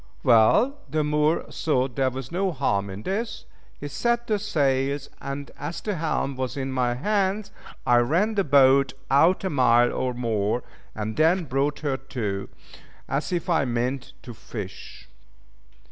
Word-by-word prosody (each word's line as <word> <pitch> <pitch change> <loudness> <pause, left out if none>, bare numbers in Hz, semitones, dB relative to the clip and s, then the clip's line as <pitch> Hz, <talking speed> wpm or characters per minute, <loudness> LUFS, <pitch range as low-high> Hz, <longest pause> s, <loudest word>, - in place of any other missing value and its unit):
Well, 140 - +4
the 155 -1 0
Moor 150 +2 +1
thought 130 -5 0
there 135 -1 +2
was 130 +1 -7
no 190 +2 0
harm 100 - 0
in 95 +2 -7
this. 215 +4 -3 0.3
He 145 - -5
set 235 +11 0
the 215 -3 0
sails, 140 -7 0
and, 140 0 -5
as 150 +4 -4
the 210 - -3
helm 155 -4 -1
was 130 +1 -3
in 135 -1 -3
my 125 -2 0
hands, 200 +6 0 0.3
I 120 - +5
ran 165 - +2
the 200 -2 +1
boat 135 -2 +5 0.2
out 160 +8 +4
a 190 - 0
mile 120 -3 +4
or 125 -1 -2
more, 115 -1 -1 0.3
and 110 0 -4
then 170 +4 +3
brought 140 0 -1
her 140 -3 -1
to, 110 -8 -4 0.6
as 140 +3 -2
if 175 +1 -2
I 165 -4 +2
meant 125 +2 -2
to 120 - -8
fish. 105 - -9
140 Hz, 160 wpm, -25 LUFS, 125-170 Hz, 0.6 s, I